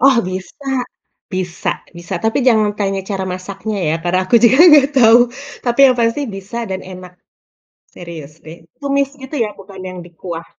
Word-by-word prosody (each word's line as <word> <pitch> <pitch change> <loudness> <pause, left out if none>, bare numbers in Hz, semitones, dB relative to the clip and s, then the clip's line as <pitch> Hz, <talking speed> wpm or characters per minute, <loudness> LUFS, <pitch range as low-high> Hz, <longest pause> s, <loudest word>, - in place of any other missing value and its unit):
Oh 265 -2 +5
bisa, 185 - -7 0.7
bisa 180 -2 -2 0.3
bisa. 170 +2 -6
Tapi 225 - +1
jangan 215 -3 +3
tanya 195 -1 -1
cara 190 -1 -2
masaknya 195 +3 -5
ya, 155 - +1
karena 175 +2 +1
aku 235 +5 +4
juga 260 +4 +5
nggak 285 -2 +7
tahu, 230 0 +7 0.5
tapi 240 +1 -1
yang 255 -1 +3
pasti 230 +5 +1 0.2
bisa 195 +4 -8
dan 190 0 -3
enak, 180 0 -11 0.8
serius 160 -4 -9
deh. 160 +2 -11 0.2
Tumis 280 -1 0
itu 265 +3 -8
ya, 210 - -4
bukan 195 -1 -12
yang 185 0 -8
dikuah. 170 -1 -8
195 Hz, 165 wpm, -17 LUFS, 180-235 Hz, 0.8 s, nggak